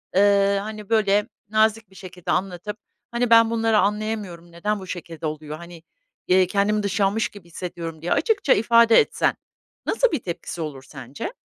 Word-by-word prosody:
eee, 200 0 +4
hani, 215 -1 -8
böyle, 210 -2 +2 0.2
nazik 220 -1 +2
bir 190 - -21
şekilde 180 -2 -6
anlatıp, 195 +2 -2 0.3
hani, 240 0 0
"Ben 230 -1 +6
bunları 225 -1 +2
anlayamıyorum. 205 -5 -2
Neden 205 +5 -2
bu 190 - -10
şekilde 165 -3 -7
oluyor? 155 0 -5
Hani, 170 0 -12 0.4
iii, 185 0 +4
kendimi 205 +2 +1
dışlanmış 200 +2 0
gibi 200 -4 -14
hissediyorum." 170 -2 -7
diye 175 - -4
açıkça 395 - +3
ifade 230 +1 +5
etsen - - +1 0.5
nasıl 485 +2 +2
bir 310 - 0
tepkisi 170 -1 -5
olur 145 -4 -6
sence? 135 - -8
200 Hz, 155 wpm, -23 LUFS, 170-220 Hz, 0.5 s, Ben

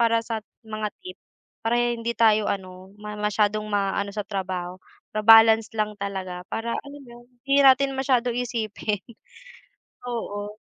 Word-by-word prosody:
para 230 -1 +3
sa 225 -2 -3 0.2
mga 215 -1 -3 0.2
tip 185 0 -9 0.4
para 230 +1 0
hindi 235 -1 -1
tayo, 215 -1 +4
ano, 185 0 -6
masyadong 210 0 -1
maano 200 0 0
sa 210 - -2
trabaho, 185 -2 -4 0.3
pa-balance 225 +1 +6
lang 215 0 0
talaga 190 -2 -4
para 230 +1 -3
alam 280 +3 -6
mo, 240 -1 -13 0.3
hindi 275 +1 +3
natin 270 0 +5
masyadong 255 -2 +1
isipin 225 -4 -3 1.0
oo. 210 -3 -5
215 Hz, 130 wpm, -24 LUFS, 200-235 Hz, 1.0 s, pa-balance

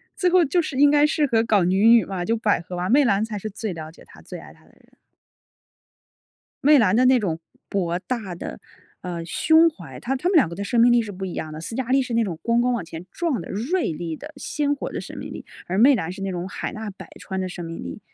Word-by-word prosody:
最 365 -2 +2
后 355 -2 +5
就 345 +5 +2
是 310 - -5
应 290 +1 +6
该 295 0 +5
适 300 -1 +1
合 230 -4 +2
搞 210 -5 +3
女 190 +5 +3
女 230 -2 +6
嘛， 185 -2 -4
就 230 +3 +1
百 210 -6 +1
合 180 +1 -7
啊， 180 +1 -2
媚 285 +4 +5
兰 200 -1 +2
才 215 -2 -5
是 215 +2 -5
最 210 -1 -5
了 160 -1 -8
解 - - -17
她、 - - -16
最 - - -9
爱 - - -13
她 - - -24
的 - - -23
人。 - - -27 1.7
媚 295 +1 +7
兰 215 -3 +3
的 255 - +4
那 255 0 +5
种 165 -6 -2 0.3
博 175 -3 -1
大 205 -2 -4
的， 65 - -7 0.4
呃， 170 -2 -5
胸 320 - +4
怀 310 - -11
她 270 +2 -2
她 335 +7 -1
们 370 - +2
两 270 - +5
个 170 - -8
的 200 - -4
生 230 +3 +1
命 240 +1 +6
力 240 - +4
是 210 -2 -7
不 190 +1 -6
一 180 - -5
样 155 -1 -5
的。 155 - -7
斯 225 - -6
嘉 260 0 -2
丽 270 +1 +4
是 250 -2 -4
那 230 -1 +3
种 170 -5 -5
咣 235 0 +1
咣 250 +1 +2
往 215 -8 -2
前 165 +2 -9
撞 330 - -1
的 165 - -9
锐 255 - -1
利 160 0 -5
的 305 +1 -10
鲜 290 0 -1
活 280 - -6
的 - - -4
生 - - -9
命 - - -7
力。 - - -8 0.2
而 185 +2 -2
媚 260 +5 +7
兰 175 -6 -2
是 195 - -10
那 195 - -2
种 180 +1 -4
海 - - -5
纳 215 -1 -6
百 195 - -11
川 190 -1 -4
的 185 - -2
生 175 -1 -7
命 165 0 -7
力。 85 - -7
215 Hz, 295 characters per minute, -23 LUFS, 180-265 Hz, 1.7 s, 媚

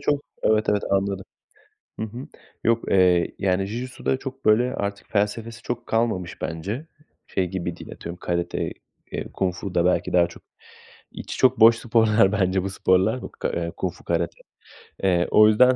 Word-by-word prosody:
çok 145 0 +1 0.2
Evet, 110 0 +2
evet, 105 -1 +2
anladım. 100 0 0 0.8
Hı - - -1
hı. 120 +7 -8 0.4
Yok, 115 0 +2
eee, 90 -2 +4
yani, 95 0 +1
Jijitsu'da 120 +4 -2
çok, 135 0 -8
böyle, 120 +4 +3
artık 100 0 -4
felsefesi 115 +2 -1
çok 120 0 -4
kalmamış 110 -6 -1
bence. 100 - -4 0.4
Şey 95 - -1
gibi 85 -2 -4
değil, - - -10
atıyorum, 85 +1 -8
karate, 85 0 -2 0.4
eee, - - -4
kung 95 -2 -1
fu 95 0 -6
da 85 -1 +3
belki 90 - +1
daha 90 -1 +5
çok 85 - -14 0.7
içi - - -7
çok 130 -3 +4
boş 115 +1 +8
sporlar 110 -4 +3
bence 95 -2 +1
bu 95 - -3
sporlar 95 +5 +2 0.2
k - - -2
eee, 85 -1 -2
kung - - -2
fu, - - -18
karate. - - -1 0.6
Eee, 90 -2 +3
o 105 0 +7
yüzden, 125 +4 +5
100 Hz, 170 wpm, -24 LUFS, 90-115 Hz, 0.8 s, boş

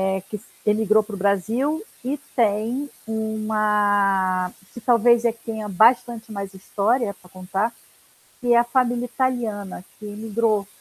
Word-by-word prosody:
eh, 190 0 0
que 210 - -3
s 205 - -14 0.2
emigrou 215 0 +3
pra 210 0 -8
o - - -6
Brasil 225 - 0 0.2
e 275 +4 -2 0.2
tem 235 +5 +1 0.2
uma 210 -4 +1 0.2
que 240 - -9
talvez 235 0 +4
é 235 - +4
a - - -5
que 230 0 -23
tenha 220 -2 -4
bastante 225 +3 +3
mais 200 -2 -6
história 205 +3 0
pra 180 - -20
contar, 190 +5 -2 0.7
que 245 -2 +2
é - - +6
a 235 - +4
família 245 0 +1
italiana 225 -7 -2
que 210 - -9
imigrou 215 0 -1
220 Hz, 155 wpm, -23 LUFS, 200-235 Hz, 0.7 s, é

